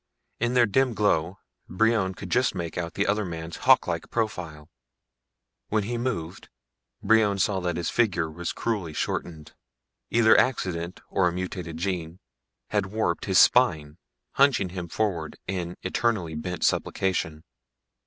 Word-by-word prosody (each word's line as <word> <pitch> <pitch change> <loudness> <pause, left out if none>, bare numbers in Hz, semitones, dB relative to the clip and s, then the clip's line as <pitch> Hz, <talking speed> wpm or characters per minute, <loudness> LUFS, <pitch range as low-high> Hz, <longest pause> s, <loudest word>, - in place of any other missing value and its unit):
In 120 +2 0
their 120 -1 +6
dim 125 +3 +1
glow 95 -3 +1 0.3
Brion 105 -1 +1
could 95 -1 -8
just 125 +1 +2
make 85 -3 -4
out 85 0 -4
the 100 - +1
other 105 +2 +1
man's 85 -2 -6
hawklike - - +3
profile. 85 -9 -3 1.0
When 105 -1 0
he 120 +4 -3
moved, 95 -9 -4 0.5
Brion 110 -3 +4
saw 100 -1 +1
that 90 -2 -2
his 85 - -2
figure 90 -9 +1
was 85 +2 -4
cruelly 100 -9 -3
shortened. 80 0 -4 0.6
Either 115 -1 +5
accident 90 -8 0
or 95 -2 +3
a - - +1
mutated 90 -2 -5
gene 85 -2 -3 0.5
had 105 -2 0
warped 95 -4 -1
his 95 -2 +2
spine, 80 -11 +4 0.3
hunching 135 -9 +3
him 90 -1 -6
forward 85 -4 -2
in 90 -2 -4
eternally 95 -3 0
bent 90 +3 -4
supplication. 80 -5 0
95 Hz, 140 wpm, -26 LUFS, 85-110 Hz, 1.0 s, their